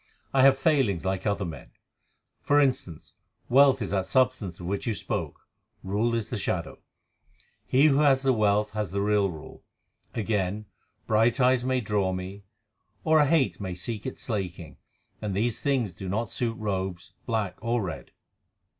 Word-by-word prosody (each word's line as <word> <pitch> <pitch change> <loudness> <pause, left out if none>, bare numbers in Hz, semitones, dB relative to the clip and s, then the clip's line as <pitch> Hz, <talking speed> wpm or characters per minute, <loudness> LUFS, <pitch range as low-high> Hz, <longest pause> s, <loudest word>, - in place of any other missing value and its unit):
I 135 - +4
have 135 0 +6
failings 135 - +1
like 95 +1 -1
other 100 -1 0
men. 80 -4 -8 0.7
For 145 +1 +3
instance, 125 - -1 0.4
wealth 135 -1 +5
is 100 - -5
that 95 -2 0
substance 120 -6 +1
of 90 - -7
which 100 +5 -3
you 110 - 0
spoke, - - -4 0.4
rule 105 +5 0
is 115 -2 -3
the 120 - -2
shadow; 85 -4 -3 0.9
he 135 +3 +4
who 145 -2 +4
has 140 -3 +4
the 135 -1 +3
wealth 105 -1 +2
has 105 -3 -3
the 100 +3 -2
real 105 -1 +2
rule. 80 -4 -10 0.5
Again, 105 -2 -1 0.4
bright 115 +4 +2
eyes 125 -1 +4
may 130 0 0
draw 105 -4 0
me, 95 +2 -6 0.6
or 160 -1 +4
a 145 - +4
hate 150 -8 +2
may 95 -2 -4
seek 105 +5 -4
its 130 - -6
slaking, 90 - -4 0.4
and 105 -3 -3
these 110 +3 -1
things 130 -8 0
do 95 +1 -7
not 110 +5 -2
suit 115 -2 -2
robes, 95 -4 -4
black 110 -5 -2
or 115 -1 0
red." 85 -4 -6
105 Hz, 165 wpm, -27 LUFS, 95-130 Hz, 0.9 s, have